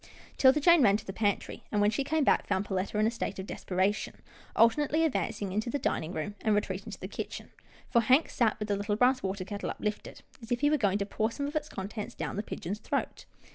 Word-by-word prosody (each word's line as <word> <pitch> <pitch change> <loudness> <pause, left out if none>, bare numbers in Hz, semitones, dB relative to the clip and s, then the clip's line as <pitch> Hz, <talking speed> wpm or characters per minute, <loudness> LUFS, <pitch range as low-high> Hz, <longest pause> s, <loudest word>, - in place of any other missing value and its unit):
'Tilda 265 +2 +6
Jane 340 +1 +6
ran 205 -4 +5
to - - -11
the 195 - -5
pantry, 205 -1 -1
and, 210 - +1
when 205 +1 +4
she 275 - -1
came 310 +2 +1
back, - - +3
found 195 0 0
Perletta 190 +1 -2
in 215 - +3
a 225 - +2
state 215 -4 -4
of 190 - -5
desperation, 190 +2 -1 0.4
alternately 295 +7 +4
advancing 205 -9 -1
into 215 +5 -1
the 285 - -1
dining 170 - -1
room, 170 +3 -4
and 215 -2 +2
re 205 - +4
treating 190 0 -6
to - - -8
the - - -5
kitchen, - - -6 0.4
for 235 - +3
Hank 255 +7 +4
sat 230 -3 +1
with 210 0 -5
the 205 - +2
little 205 +1 -1
brass 250 +3 +3
water 190 -1 -3
kettle 200 +1 -4
uplifted, 210 0 -4 0.2
as 225 - -11
if 240 - 0
he 290 0 +4
were - - +5
going 200 -6 +2
to 200 - -1
pour 220 +2 -1
some 280 +5 -4
of 290 +2 -5
its 305 0 -2
contents 205 +2 -6
down - - -4
the 205 - -1
pigeon's 205 -1 -5
throat. - - -3
210 Hz, 245 wpm, -30 LUFS, 200-260 Hz, 0.4 s, Tilda